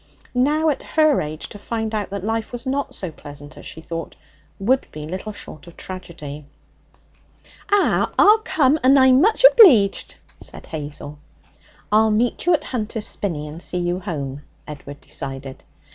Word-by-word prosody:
Now, 300 Hz, +5 st, +2 dB
at 290 Hz, -, -1 dB
her 310 Hz, -3 st, +2 dB
age, 155 Hz, +1 st, -5 dB
to 205 Hz, -, -11 dB
find 220 Hz, +1 st, -4 dB
out 210 Hz, -2 st, -2 dB
that 200 Hz, -1 st, -5 dB
life 225 Hz, +1 st, -2 dB
was 245 Hz, +1 st, -7 dB
not 275 Hz, +2 st, -2 dB
so 185 Hz, -4 st, -5 dB
pleasant 145 Hz, -1 st, -12 dB
as -, -, -11 dB
she 160 Hz, -, -9 dB
thought 165 Hz, 0 st, -6 dB, 0.4 s
would 255 Hz, +7 st, +1 dB
be 150 Hz, 0 st, -7 dB
little 185 Hz, +6 st, -5 dB
short 170 Hz, -6 st, -11 dB
of 170 Hz, -, -14 dB
tragedy. 150 Hz, -6 st, -8 dB, 1.2 s
'Ah, 410 Hz, -1 st, +3 dB
I'll 425 Hz, +2 st, +7 dB
come, 315 Hz, -, +2 dB
and 270 Hz, +2 st, +6 dB
I'm 260 Hz, 0 st, +6 dB
much 440 Hz, +6 st, +4 dB
obleeged,' 290 Hz, -, +6 dB, 0.2 s
said -, -, -8 dB
Hazel. 150 Hz, -1 st, -7 dB, 0.7 s
'I'll 220 Hz, +1 st, +4 dB
meet 230 Hz, +9 st, 0 dB
you 355 Hz, -, +5 dB
at -, -, -4 dB
Hunter's 220 Hz, -3 st, -4 dB
Spinney 155 Hz, -7 st, -3 dB
and 155 Hz, +3 st, -9 dB
see 180 Hz, -, -3 dB
you 175 Hz, 0 st, -1 dB
home.' 145 Hz, -7 st, -5 dB, 0.2 s
Edward 145 Hz, -1 st, -10 dB
decided. 135 Hz, -1 st, -6 dB
205 Hz, 160 wpm, -21 LUFS, -, 1.2 s, I'll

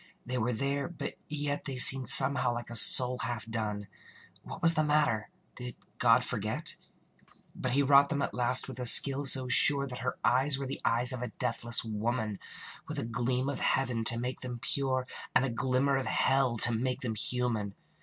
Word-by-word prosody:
They 125 Hz, 0 st, -5 dB
were 120 Hz, +2 st, -2 dB
there, 140 Hz, +4 st, -4 dB
but 175 Hz, -, -8 dB, 0.2 s
yet 145 Hz, -1 st, -5 dB
They 135 Hz, -3 st, -6 dB
seemed 130 Hz, +1 st, +6 dB
somehow 130 Hz, -2 st, +5 dB
like 120 Hz, 0 st, -9 dB
a -, -, -8 dB
soul 125 Hz, +3 st, +7 dB
half 120 Hz, -3 st, -6 dB
done. 105 Hz, -3 st, -6 dB, 0.5 s
What -, -, -11 dB
was 165 Hz, 0 st, +4 dB
the 155 Hz, -2 st, -1 dB
matter? 150 Hz, -8 st, -1 dB, 0.3 s
Did 125 Hz, -1 st, -9 dB, 0.2 s
God -, -, +2 dB
forget?... -, -, -5 dB, 0.8 s
But 125 Hz, -, -5 dB
he 140 Hz, +1 st, +1 dB
wrought 140 Hz, 0 st, +3 dB
them 140 Hz, -3 st, -3 dB
at -, -, -5 dB
last 125 Hz, +1 st, 0 dB
with 130 Hz, -1 st, -10 dB
a 125 Hz, -, -2 dB
skill 140 Hz, +4 st, +5 dB
so 130 Hz, -1 st, +5 dB
sure 140 Hz, +3 st, +4 dB
That 125 Hz, -2 st, -9 dB
her 125 Hz, +2 st, -5 dB
eyes 135 Hz, +3 st, +1 dB
were 140 Hz, -, -6 dB
the 135 Hz, +1 st, -8 dB
eyes 120 Hz, +2 st, 0 dB
of 125 Hz, -, -7 dB
a 125 Hz, -, -5 dB
deathless 120 Hz, -1 st, -3 dB
woman, 110 Hz, -1 st, -5 dB, 0.5 s
With 155 Hz, -, -8 dB
a 140 Hz, -, -5 dB
gleam 125 Hz, +3 st, -4 dB
of 140 Hz, -2 st, -5 dB
heaven 125 Hz, -4 st, -2 dB
to 115 Hz, -, +2 dB
make 125 Hz, +2 st, -6 dB
them 125 Hz, -1 st, -7 dB
pure, 130 Hz, +1 st, -4 dB, 0.3 s
And 135 Hz, -, +2 dB
a 130 Hz, -, -5 dB
glimmer 130 Hz, +3 st, -2 dB
of 135 Hz, -, -5 dB
hell 135 Hz, -3 st, -1 dB
to 120 Hz, +2 st, +5 dB
make 125 Hz, +3 st, -4 dB
them 120 Hz, -3 st, -5 dB
human. 110 Hz, -3 st, -4 dB
125 Hz, 195 wpm, -28 LUFS, 120-135 Hz, 0.8 s, soul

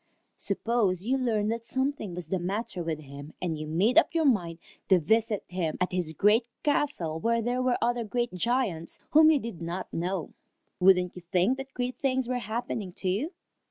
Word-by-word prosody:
Suppose 200 Hz, -3 st, 0 dB
you 255 Hz, +3 st, +2 dB
learned 225 Hz, -5 st, +1 dB
that 230 Hz, 0 st, -3 dB
something 260 Hz, -6 st, -2 dB
was 180 Hz, -1 st, -7 dB
the 190 Hz, -, 0 dB
matter 195 Hz, +2 st, -3 dB
with 160 Hz, -2 st, -3 dB
him, 140 Hz, +1 st, -10 dB
and 170 Hz, -3 st, -2 dB
you 155 Hz, 0 st, -5 dB
made 200 Hz, -, +4 dB
up 335 Hz, -, -1 dB
your 325 Hz, -1 st, +3 dB
mind 175 Hz, -, +2 dB, 0.3 s
to 190 Hz, -, +7 dB
visit 220 Hz, +5 st, +1 dB
him 175 Hz, -3 st, -2 dB
at 180 Hz, -, 0 dB
his 180 Hz, -3 st, -1 dB
great 215 Hz, +7 st, +3 dB, 0.2 s
castle 275 Hz, -, 0 dB
where 230 Hz, +4 st, +1 dB
there 245 Hz, +2 st, 0 dB
were 255 Hz, -1 st, +2 dB
other 240 Hz, 0 st, +1 dB
great 240 Hz, +1 st, -2 dB
giants 185 Hz, -5 st, -1 dB
whom 310 Hz, +1 st, +7 dB
you 315 Hz, -, +5 dB
did 230 Hz, -, -6 dB
not 175 Hz, +3 st, -5 dB
know. 180 Hz, 0 st, -2 dB, 0.5 s
Wouldn't 180 Hz, -1 st, +4 dB
you 180 Hz, -, -8 dB
think 195 Hz, +8 st, +3 dB
that 270 Hz, 0 st, -8 dB
great 250 Hz, 0 st, -3 dB
things 260 Hz, -2 st, +1 dB
were 250 Hz, 0 st, -1 dB
happening 220 Hz, -3 st, -4 dB
to 185 Hz, -, -2 dB
you? 230 Hz, -, -1 dB
210 Hz, 195 wpm, -28 LUFS, 180-245 Hz, 0.5 s, to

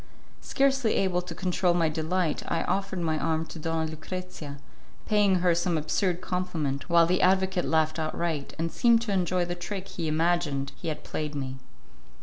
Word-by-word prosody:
Scarcely 270 Hz, -4 st, +2 dB
able 180 Hz, -2 st, +1 dB
to 175 Hz, -2 st, -8 dB
control 180 Hz, -1 st, +1 dB
my 165 Hz, -2 st, +3 dB
delight, 160 Hz, +1 st, 0 dB
I 165 Hz, -, 0 dB
offered 195 Hz, -1 st, -1 dB
my 160 Hz, -2 st, 0 dB
arm 160 Hz, 0 st, 0 dB
to 160 Hz, -, -9 dB
Donna 160 Hz, 0 st, -1 dB
Lucrezia, 160 Hz, -3 st, -7 dB, 0.5 s
paying 205 Hz, -3 st, +3 dB
her 175 Hz, -1 st, +4 dB
some 170 Hz, 0 st, +1 dB
absurd 175 Hz, +4 st, 0 dB
compliment, 165 Hz, -6 st, -2 dB
while 170 Hz, 0 st, +6 dB
the 180 Hz, +2 st, +1 dB
advocate 190 Hz, 0 st, +3 dB
laughed 160 Hz, 0 st, +1 dB
outright, 155 Hz, -2 st, -2 dB
and 165 Hz, +1 st, -1 dB
seemed 235 Hz, -1 st, +4 dB
to 220 Hz, -, -3 dB
enjoy 180 Hz, -1 st, +1 dB
the 175 Hz, -, -3 dB
trick 185 Hz, +2 st, -5 dB
he 165 Hz, -2 st, -4 dB
imagined 155 Hz, -3 st, +1 dB
he -, -, -7 dB
had 155 Hz, -, -3 dB
played 150 Hz, -1 st, -4 dB
me. 135 Hz, -2 st, -4 dB
170 Hz, 170 wpm, -27 LUFS, 155-185 Hz, 0.5 s, while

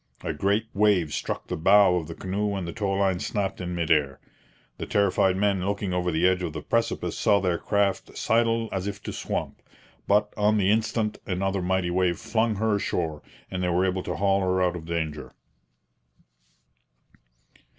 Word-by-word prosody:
A 80 Hz, -, -2 dB
great 100 Hz, +8 st, +1 dB
wave 100 Hz, -7 st, +2 dB
struck -, -, -3 dB
the -, -, -4 dB
bow 95 Hz, +2 st, +5 dB
of 80 Hz, -3 st, -4 dB
the 85 Hz, -, -7 dB
canoe 100 Hz, +2 st, -2 dB
and 95 Hz, -3 st, -4 dB
the 85 Hz, -, -5 dB
tow 100 Hz, -3 st, -1 dB
line 95 Hz, -2 st, +1 dB
snapped 95 Hz, -2 st, -2 dB
in 90 Hz, 0 st, -4 dB
mid 85 Hz, -1 st, -1 dB
air. 70 Hz, -4 st, +2 dB, 0.6 s
The -, -, -4 dB
terrified 95 Hz, -2 st, +2 dB
men 100 Hz, -2 st, +1 dB
looking 100 Hz, -1 st, -2 dB
over 90 Hz, 0 st, 0 dB
the 80 Hz, +3 st, +3 dB
edge 95 Hz, 0 st, +1 dB
of 85 Hz, -4 st, -3 dB
the 75 Hz, -, -6 dB
precipice 115 Hz, 0 st, -1 dB
saw 100 Hz, -, +3 dB
their 90 Hz, -3 st, 0 dB
craft 100 Hz, -2 st, -1 dB
sidle 115 Hz, 0 st, +1 dB
as 95 Hz, 0 st, -3 dB
if 100 Hz, 0 st, -6 dB
to -, -, -5 dB
swamp; -, -, -4 dB, 0.5 s
but, 105 Hz, +1 st, +2 dB
on 105 Hz, +1 st, +2 dB
the 100 Hz, -1 st, +3 dB
instant, 110 Hz, 0 st, 0 dB
another 95 Hz, +1 st, -1 dB
mighty 90 Hz, -1 st, 0 dB
wave 90 Hz, -1 st, +1 dB
flung 110 Hz, 0 st, 0 dB
her 105 Hz, 0 st, +1 dB
ashore, 80 Hz, -6 st, -2 dB, 0.3 s
and 90 Hz, -1 st, -3 dB
they 90 Hz, -, 0 dB
were 90 Hz, +2 st, +2 dB
able 95 Hz, 0 st, 0 dB
to -, -, -4 dB
haul 100 Hz, 0 st, +2 dB
her 95 Hz, 0 st, +1 dB
out 90 Hz, -1 st, +1 dB
of 80 Hz, -2 st, -7 dB
danger. 80 Hz, -3 st, -4 dB
95 Hz, 185 wpm, -26 LUFS, 90-100 Hz, 0.6 s, bow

